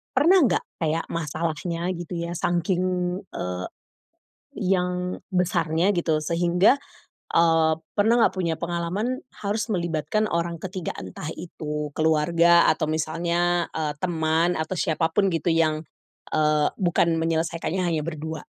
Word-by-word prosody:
pernah 335 Hz, +8 st, +6 dB
enggak -, -, +1 dB, 0.2 s
kayak, 160 Hz, +1 st, 0 dB
masalahnya 165 Hz, +2 st, -2 dB
gitu, 175 Hz, +1 st, -7 dB
ya, 170 Hz, 0 st, -3 dB
sangking, 175 Hz, +1 st, 0 dB, 0.5 s
eee, 90 Hz, 0 st, -4 dB, 0.9 s
yang 180 Hz, -1 st, -1 dB
besarnya, 180 Hz, 0 st, +1 dB
gitu, 170 Hz, -3 st, +1 dB
sehingga, 175 Hz, -, +3 dB, 0.5 s
eee, 165 Hz, -1 st, +4 dB, 0.3 s
pernah 220 Hz, +3 st, +4 dB
nggak -, -, +4 dB
punya 170 Hz, -3 st, 0 dB
pengalaman 180 Hz, -, -2 dB, 0.2 s
harus 205 Hz, +1 st, -1 dB
melibatkan 175 Hz, +4 st, 0 dB
orang 170 Hz, -1 st, -2 dB
ketiga? 185 Hz, -2 st, -4 dB
Entah 95 Hz, -, -7 dB
itu 150 Hz, -3 st, -5 dB
keluarga 165 Hz, +2 st, +4 dB
atau 155 Hz, -, +2 dB
misalnya, 170 Hz, +3 st, 0 dB
eee, 150 Hz, -2 st, -2 dB
teman 165 Hz, 0 st, +1 dB
atau 170 Hz, +4 st, -3 dB
siapa 160 Hz, 0 st, +1 dB
pun 195 Hz, +2 st, +1 dB
gitu 165 Hz, +1 st, -1 dB
yang, 160 Hz, -2 st, +2 dB, 0.5 s
eee, 150 Hz, -1 st, +3 dB
bukan 170 Hz, -2 st, +2 dB
menyelesaikannya 165 Hz, +2 st, -1 dB
hanya 160 Hz, -2 st, 0 dB
berdua. 160 Hz, -1 st, -5 dB
170 Hz, 125 wpm, -24 LUFS, 160-180 Hz, 0.9 s, pernah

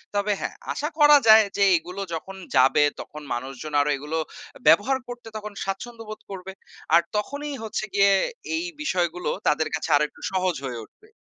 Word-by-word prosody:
তবে 205 Hz, +1 st, +1 dB
হ্যা! -, -, -2 dB, 0.2 s
আশা 300 Hz, -, -2 dB
করা 295 Hz, 0 st, +8 dB
যায় 220 Hz, 0 st, +9 dB
যে 200 Hz, -, +4 dB
এগুলো 180 Hz, +4 st, -7 dB
যখন 190 Hz, +4 st, -6 dB, 0.2 s
যাবে, 135 Hz, +3 st, +5 dB, 0.2 s
তখন 150 Hz, 0 st, -8 dB
মানুষজন 135 Hz, +5 st, -6 dB
আরো 145 Hz, -, 0 dB
এগুলো 150 Hz, +4 st, -4 dB, 0.4 s
আ -, -, -23 dB
ব্যবহার 205 Hz, +12 st, +5 dB
করতে 240 Hz, -2 st, -9 dB
তখন 215 Hz, -1 st, -7 dB
স্বাচ্ছন্দ্য 225 Hz, +4 st, -5 dB
বোধ 215 Hz, -, -7 dB
করবে। 190 Hz, 0 st, -7 dB, 0.4 s
আর 170 Hz, -, +7 dB
তখনই 285 Hz, +7 st, -3 dB
হচ্ছে 220 Hz, 0 st, -3 dB
গিয়ে 200 Hz, 0 st, +5 dB, 0.4 s
এই 330 Hz, +2 st, -2 dB, 0.2 s
বিষয়গুলো 180 Hz, -, -1 dB, 0.2 s
তাদের 155 Hz, +1 st, +2 dB
কাছে 160 Hz, -, -4 dB
আরেকটু 150 Hz, 0 st, -3 dB
সহজ 185 Hz, -2 st, 0 dB
হয়ে 120 Hz, -3 st, -4 dB
উঠবে। 425 Hz, -, -25 dB
195 Hz, 170 wpm, -24 LUFS, 155-220 Hz, 0.4 s, যায়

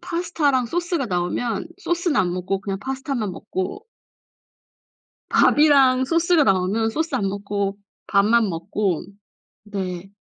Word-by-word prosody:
파스타랑 325 Hz, -7 st, 0 dB
소스가 340 Hz, -1 st, -1 dB
나오면 190 Hz, -, -2 dB
소스는 345 Hz, -4 st, -1 dB
안 175 Hz, -5 st, +2 dB
먹고 190 Hz, +2 st, -2 dB
그냥 195 Hz, -1 st, -4 dB
파스타만 265 Hz, -4 st, -3 dB
먹고 200 Hz, -, -5 dB, 1.4 s
밥이랑 275 Hz, -4 st, +5 dB
소스가 335 Hz, +1 st, +3 dB
나오면 195 Hz, +1 st, +1 dB
소스 320 Hz, +6 st, -2 dB
안 205 Hz, -6 st, 0 dB
먹고 200 Hz, 0 st, -3 dB, 0.3 s
밥만 215 Hz, +2 st, +3 dB
먹고. 175 Hz, +1 st, -2 dB, 0.6 s
네. 190 Hz, -3 st, -5 dB
225 Hz, 250 characters per minute, -22 LUFS, 195-290 Hz, 1.4 s, 밥이랑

